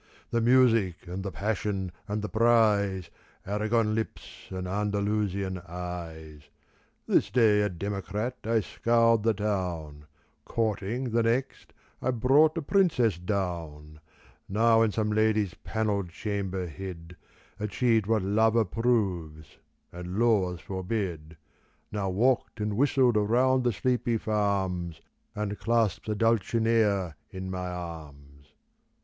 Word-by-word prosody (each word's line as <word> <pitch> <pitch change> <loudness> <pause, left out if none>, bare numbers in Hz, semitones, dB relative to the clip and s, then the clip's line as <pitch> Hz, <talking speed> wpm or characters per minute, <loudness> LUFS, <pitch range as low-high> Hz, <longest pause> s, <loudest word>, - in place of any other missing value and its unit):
The 115 - +1
music 115 -7 +3
and 90 +2 -5
the 100 0 -4
passion 100 -3 -2 0.2
and 105 +1 -3
the - - -1
prize, 105 -5 +2 0.3
Aragon 110 +2 +1
lips 110 0 -5
and 95 -1 -5
Andalusian 100 -1 -1
eyes. 80 -4 -7 0.6
This - - +2
day 110 -4 +4
a 105 - +1
democrat 100 +6 -3
I 115 0 +2
scoured 115 +1 +2
the 115 0 +2
town; 85 -8 -3 0.4
Courting, 115 +3 -2
the 115 +1 +2
next, 120 +4 -1 0.3
I - - 0
brought 135 +7 +4
a 165 - -2
princess 135 - +2
down: 85 -6 -4 0.5
Now 115 +3 +4
in 110 -2 +3
some 105 0 -1
lady's 105 -3 +2
panelled 105 -4 -2
chamber 95 -1 -3
hid 90 0 -8 0.4
Achieved 110 0 +1
what 110 -3 +2
love 110 +3 +2
approves 95 -9 -1 0.3
and 90 +2 -6
laws 100 -7 +2
forbid, 90 -5 -4 0.5
Now 100 -2 -2
walked 115 +5 +1
and 105 -1 -1
whistled 130 -2 +3
round 125 +5 +3
the 120 - +2
sleepy 120 +1 0
farms 95 -6 -1 0.4
And 105 -1 -3
clasped 110 -1 0
a 105 - 0
Dulcinea 110 -5 +1
in 95 -2 -6
my 90 -1 -3
arms. 75 -5 -9
105 Hz, 120 wpm, -28 LUFS, 90-115 Hz, 0.6 s, day